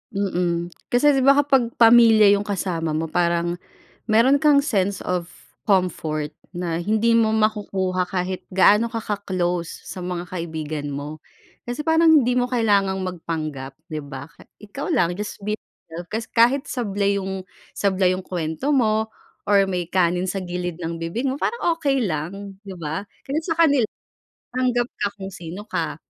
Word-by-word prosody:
Mm. 175 -3 -1 0.2
Kasi 270 +5 +4
di 270 - +2
ba 275 +1 +5
kapag 270 -4 +3
pamilya 225 -3 +7
yung 205 +1 +1
kasama 170 -6 -2
mo 160 0 -2
parang 170 0 0 0.5
meron 260 +7 +4
kang 295 -2 +6
sense 200 -9 0
of 180 -1 -2 0.3
comfort 155 -6 0 0.2
na 175 -2 -3
hindi 220 +4 +2
mo 225 -1 +4
makukuha 205 -4 0
kahit 185 0 -2
gaano 210 +5 +4
ka 225 - -3
ka-close 185 -5 -3
sa 185 - -7
mga 175 0 -4
kaibigan 160 -4 -5
mo. 145 +2 -6 0.4
Kasi 245 +5 -5
parang 320 0 +5
hindi 250 -6 +5
mo 250 0 +1
kailangang 200 -5 +2
magpanggap, 155 -6 -5
di 155 -1 -5
ba? 140 -1 -8
Ka 165 - -19 0.2
ikaw 210 +7 -7
lang, 175 - +2
just 205 +3 -6
be 210 +1 0
yourself. 170 -4 -11
Kasi 225 +1 -3
kahit 245 +4 +4
sablay 200 -5 -1
yung 190 0 -5 0.3
sablay 190 -2 +2
yung 185 - -7
kuwento 175 - -2
mo 220 -4 +2 0.4
or 200 -1 +4
may 180 -2 -2
kanin 180 0 +1
sa 195 +1 -3
gilid 175 -1 -4
ng 165 0 -3
bibig 165 +10 -3
mo 270 - -4
parang 475 - -2 0.2
okey 275 -4 +1
lang, 195 +3 -4
di 195 - -7
ba? 165 +3 -4 0.2
Kasi 280 +3 -2
sa 330 - 0
kanila, 285 -7 +5 0.7
tanggap 250 -1 +1
ka - - +2
kung 195 -1 -7
sino 180 +3 -8
ka. 215 - -3
195 Hz, 160 wpm, -22 LUFS, 175-230 Hz, 0.7 s, pamilya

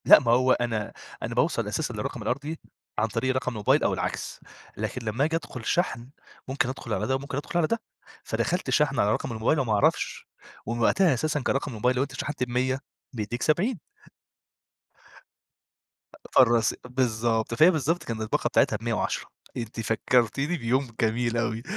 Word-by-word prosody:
لأ - - +10
ما 120 -5 +1
هو 130 +2 +4
أنا 115 -4 0 0.3
أنا - - -3
باوصل - - +1
أساسًا - - -2
للرقم - - -4
الأرضي 145 +5 -3 0.4
عن 110 - +2
طريق 130 +5 -1
رقم 130 -1 -1
الموبايل 105 -4 +2
أو - - +2
العكس، - - -3 0.4
لكن 125 - -4
لما 115 +5 0
آجي 160 +1 0
أدخل 125 -7 -5
شحن 130 -9 0 0.4
ممكن 130 -1 0
أدخل 120 -4 -5
على 105 +1 -1
ده 130 - +2
وممكن 135 0 -4
أدخل 145 +4 -3
على 160 - +3
ده، 230 +4 -1 0.4
فدخلت 180 +1 -1
شحن 150 -2 +2
على 105 +1 +3
رقم - - -2
الموبايل 115 +7 +1
وما 120 -5 +1
أعرفش، 100 - +1 0.4
ومن 115 +2 -3
وقتها 175 +6 +4
أساسًا 150 +4 0
كرقم 135 +2 -1
الموبايل 125 +3 +1
لوأنت 135 +1 -1
شحنت 140 0 -3
ب100 125 +2 0 0.3
بيدِّيك 120 +1 -4
70 190 +8 +1 2.6
فالرص 115 -3 +5
بالضبط 115 -3 0
فهي 155 +9 +6
بالضبط 160 +2 0
كانت 115 -1 -4
الباقة 110 - 0
بتاعتها - - +3
ب110 - - -2 0.3
أنتِ 115 -1 -5
فكرتيني 125 +8 +1
بيوم 130 +1 0
جميل 115 +1 +1
أوي، 115 0 -1
125 Hz, 160 wpm, -26 LUFS, 115-140 Hz, 2.6 s, لأ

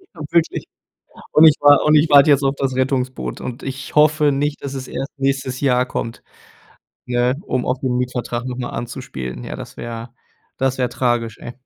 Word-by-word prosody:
Ja, - - -13
wirklich. 170 -1 +1 0.7
Und 155 - +7
ich 150 - +6
war 145 -1 +6
und 150 0 +5
ich 155 +1 +4
warte 140 +1 +7
jetzt 140 0 +4
auf 135 +1 +1
das 135 -2 -2
Rettungsboot 130 0 -2
und 125 -1 -6
ich 135 +1 -6
hoffe 150 -1 +4
nicht, 145 +2 -2
dass 140 -1 -5
es 130 -1 -6
erst 135 - -5
nächstes 135 -1 -1
Jahr 125 -2 +2
kommt. 115 -2 -5 0.8
Ne, 125 +1 +1
um 130 -10 -2
auf 125 +1 -1
den 125 -2 -1
Mietvertrag 125 -1 -3
noch 125 -1 -4
mal 120 - -4
anzuspielen. 65 - -6
Ja, - - -6
das - - -10
wäre 115 0 -7 0.5
das 130 0 0
wäre 125 - +1
tragisch, 120 -4 -1
ey. 120 - -8
130 Hz, 190 wpm, -20 LUFS, 125-140 Hz, 0.8 s, Und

